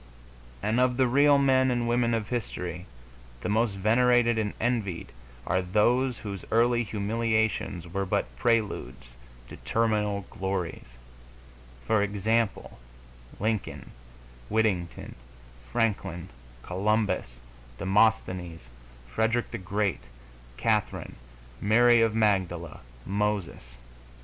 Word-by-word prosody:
And 110 Hz, +3 st, +1 dB
of 125 Hz, -1 st, +2 dB
the 130 Hz, -, +4 dB
real 140 Hz, +3 st, +5 dB
men 130 Hz, -1 st, +3 dB
and 120 Hz, -1 st, 0 dB
women 120 Hz, -1 st, +2 dB
of 110 Hz, -1 st, -3 dB
history, 90 Hz, -7 st, -4 dB, 0.5 s
the -, -, -3 dB
most 110 Hz, -1 st, +1 dB
venerated 120 Hz, +3 st, +3 dB
and 105 Hz, -2 st, -2 dB
envied 110 Hz, -8 st, -2 dB, 0.3 s
are 95 Hz, -, +1 dB
those 120 Hz, +7 st, +2 dB
whose 100 Hz, -3 st, -7 dB
early 120 Hz, +1 st, +3 dB
humiliations 110 Hz, -3 st, -1 dB
were 95 Hz, +2 st, -3 dB
but -, -, -1 dB
preludes 65 Hz, -, -1 dB, 0.3 s
to -, -, -10 dB
terminal 105 Hz, -, 0 dB
glories; 95 Hz, -, -4 dB, 0.9 s
for 110 Hz, -, +2 dB
example, 105 Hz, -, -1 dB, 0.6 s
Lincoln, 110 Hz, 0 st, -3 dB, 0.6 s
Whittington, 105 Hz, -6 st, -1 dB, 0.6 s
Franklin, 95 Hz, -, -1 dB, 0.3 s
Columbus, 100 Hz, -, 0 dB, 0.4 s
Demosthenes, 95 Hz, -, +1 dB, 0.5 s
Frederick 110 Hz, -, 0 dB
the -, -, -4 dB
Great, 95 Hz, -, -2 dB, 0.5 s
Catherine, -, -, -1 dB, 0.5 s
Mary 120 Hz, +3 st, +5 dB
of 115 Hz, -1 st, +2 dB
Magdala, 95 Hz, -6 st, 0 dB, 0.3 s
Moses. 100 Hz, -11 st, -2 dB
105 Hz, 100 wpm, -27 LUFS, 95-115 Hz, 0.9 s, real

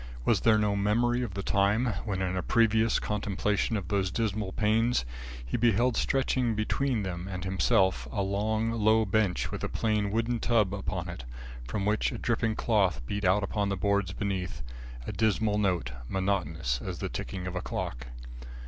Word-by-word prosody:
Was -, -, +3 dB
there 110 Hz, -2 st, +5 dB
no 105 Hz, -1 st, +1 dB
memory 120 Hz, +5 st, +2 dB
of 110 Hz, -7 st, -4 dB
the 100 Hz, -, -3 dB
time 100 Hz, +5 st, +2 dB, 0.2 s
when, 95 Hz, -3 st, -1 dB
in 95 Hz, 0 st, -1 dB
a 90 Hz, -, 0 dB
previous 115 Hz, +2 st, +3 dB
contemplation 105 Hz, +1 st, -1 dB
of 95 Hz, -5 st, -6 dB
those 100 Hz, -2 st, +1 dB
dismal 105 Hz, -1 st, -1 dB
panes, 110 Hz, -, +2 dB, 0.4 s
he -, -, -2 dB
beheld 120 Hz, +1 st, +3 dB
stretching 130 Hz, -3 st, +1 dB
between 115 Hz, +2 st, 0 dB
them 90 Hz, -1 st, -4 dB
and 90 Hz, -1 st, -5 dB
himself, 95 Hz, 0 st, +2 dB
a 100 Hz, -, -1 dB
long, 110 Hz, +3 st, 0 dB
low 110 Hz, 0 st, +3 dB
bench 100 Hz, -2 st, +1 dB
with -, -, -5 dB
a -, -, -1 dB
plain 105 Hz, -2 st, 0 dB
wooden 115 Hz, +3 st, 0 dB
tub 110 Hz, -5 st, +2 dB
upon 95 Hz, -2 st, -3 dB
it, 85 Hz, -7 st, -7 dB, 0.4 s
from 95 Hz, +11 st, -2 dB
which 105 Hz, +1 st, +1 dB
a -, -, -5 dB
dripping 115 Hz, -2 st, 0 dB
cloth 95 Hz, -, +1 dB
beat 100 Hz, +9 st, -3 dB
out 95 Hz, +3 st, +3 dB
upon 100 Hz, 0 st, -1 dB
the 100 Hz, -, -1 dB
boards 100 Hz, -1 st, +1 dB
beneath 95 Hz, -5 st, -3 dB, 0.4 s
a -, -, -3 dB
dismal 110 Hz, -1 st, +1 dB
note, 90 Hz, -11 st, 0 dB, 0.2 s
monotonous 80 Hz, -10 st, -1 dB
as -, -, -4 dB
the -, -, -3 dB
ticking 95 Hz, -2 st, -5 dB
of 90 Hz, 0 st, -4 dB
a 90 Hz, -, -2 dB
clock? -, -, -4 dB
100 Hz, 175 wpm, -29 LUFS, 95-110 Hz, 0.4 s, there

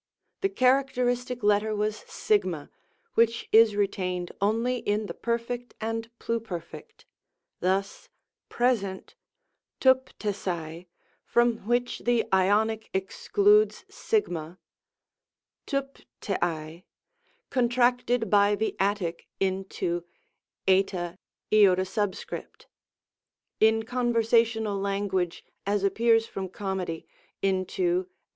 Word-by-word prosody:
The 390 Hz, -, +2 dB
characteristic 250 Hz, -, +1 dB
letter 210 Hz, +1 st, +2 dB
was 210 Hz, +1 st, 0 dB
Sigma, 425 Hz, -1 st, 0 dB, 0.4 s
which 230 Hz, 0 st, +2 dB
is 220 Hz, -1 st, +6 dB
retained 185 Hz, -3 st, -1 dB
only 230 Hz, +5 st, +1 dB
in 210 Hz, -2 st, -1 dB
the -, -, -5 dB
Perf. 235 Hz, +1 st, -3 dB
and 225 Hz, +1 st, -3 dB
Pluperf. 180 Hz, -11 st, -4 dB, 0.8 s
Thns, 195 Hz, -, -1 dB, 0.4 s
Pres. 245 Hz, -2 st, +2 dB, 1.0 s
rvnTtoaiy 190 Hz, -10 st, 0 dB, 0.4 s
from 235 Hz, -1 st, +2 dB
which 245 Hz, +1 st, 0 dB
the 240 Hz, -2 st, +1 dB
Ionic 215 Hz, +4 st, +2 dB
excludes 410 Hz, -, +2 dB
6; 435 Hz, -2 st, 0 dB, 1.4 s
TVTCTtaty 175 Hz, -, -3 dB, 0.7 s
contracted 245 Hz, -1 st, +2 dB
by 205 Hz, 0 st, +5 dB
the 220 Hz, +2 st, -2 dB
Attic 195 Hz, -4 st, -1 dB
into 190 Hz, -2 st, -1 dB, 0.6 s
ri; 185 Hz, -2 st, +2 dB, 0.3 s
in 210 Hz, -1 st, +6 dB, 2.2 s
con 245 Hz, +1 st, -1 dB
versational 225 Hz, -3 st, +2 dB
language, 195 Hz, -3 st, -1 dB, 0.2 s
as 200 Hz, 0 st, +1 dB
appears 225 Hz, +3 st, +3 dB
from 190 Hz, -4 st, -5 dB
Comedy, 190 Hz, -4 st, -4 dB, 0.4 s
into 190 Hz, -, 0 dB
u. 360 Hz, +1 st, +1 dB
215 Hz, 85 wpm, -27 LUFS, 190-245 Hz, 2.2 s, is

